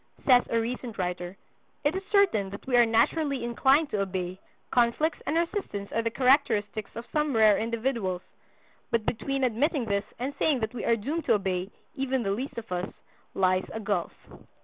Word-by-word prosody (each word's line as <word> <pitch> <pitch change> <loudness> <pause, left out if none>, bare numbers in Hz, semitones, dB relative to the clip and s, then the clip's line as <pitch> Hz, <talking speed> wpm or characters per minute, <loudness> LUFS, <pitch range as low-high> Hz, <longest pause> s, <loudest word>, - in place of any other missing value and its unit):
Says 250 -2 +7
a 230 - +2
recent 235 0 -4
writer: 180 0 -3 0.5
"It 295 +4 +1
is 380 - -2
certain 385 - +3
that 200 +1 -9
we 260 - +1
are 240 -1 +6
naturally 270 +5 +1
inclined 270 +5 +3
to 205 - 0
obey, 185 -1 -3 0.3
conflicts 250 +6 +2
and 310 - +1
resistance 335 - -2
are 230 - +1
the 230 - 0
characteristics 225 -5 +2
of 230 +1 -6
some 300 -3 +1
rare 215 -2 +5
individuals; 225 -5 -2 0.7
but 230 -2 0
between 275 +3 -1
admitting 255 +3 +1
this 200 -1 -1
and 260 +4 -3
saying 280 -6 +2
that 220 +1 -2
we 240 - -4
are 230 - +4
doomed 290 +10 -3
to - - +4
obey—even 205 +7 -3
the 195 - 0
least 250 +7 -4
of 230 -4 -7
us—lies 185 +1 -2
a 220 - -4
gulf." 200 -5 -1
230 Hz, 170 wpm, -27 LUFS, 200-270 Hz, 0.7 s, Says